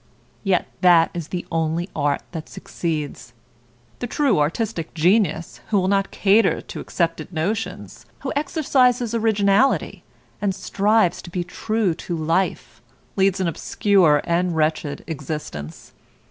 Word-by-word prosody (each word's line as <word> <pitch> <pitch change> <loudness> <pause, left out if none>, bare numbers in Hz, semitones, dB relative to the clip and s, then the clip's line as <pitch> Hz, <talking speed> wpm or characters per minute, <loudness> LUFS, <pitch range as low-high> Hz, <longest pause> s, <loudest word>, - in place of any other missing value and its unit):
Yet 190 -4 +1
that 175 -3 +5
is 170 -3 -5
the 175 0 -4
only 165 +1 0
art 145 -2 0
that 165 -2 -7
succeeds. 150 -7 -5 0.7
The 245 - -3
true 255 - +2
artistic 165 +2 -2
genius, 170 -1 +1
who 210 -2 +2
will 185 - 0
not 195 0 +1
cater 205 +1 +3
to - - -8
accepted 165 -1 -2
notions, 200 +7 -4
who - - -3
exercises 255 -6 +2
originality, 220 +2 +2 0.4
and 200 -2 0
strives 205 -2 +1
to 175 - -10
be 175 0 -2
true 215 +1 -1
to 170 +1 -5
life, 165 +4 -1 0.3
leads 195 -1 +2
an 185 - +1
obscure 170 -2 +3
and 175 0 0
wretched 155 -1 -1
existence. 140 - -6
180 Hz, 130 wpm, -22 LUFS, 160-205 Hz, 0.7 s, that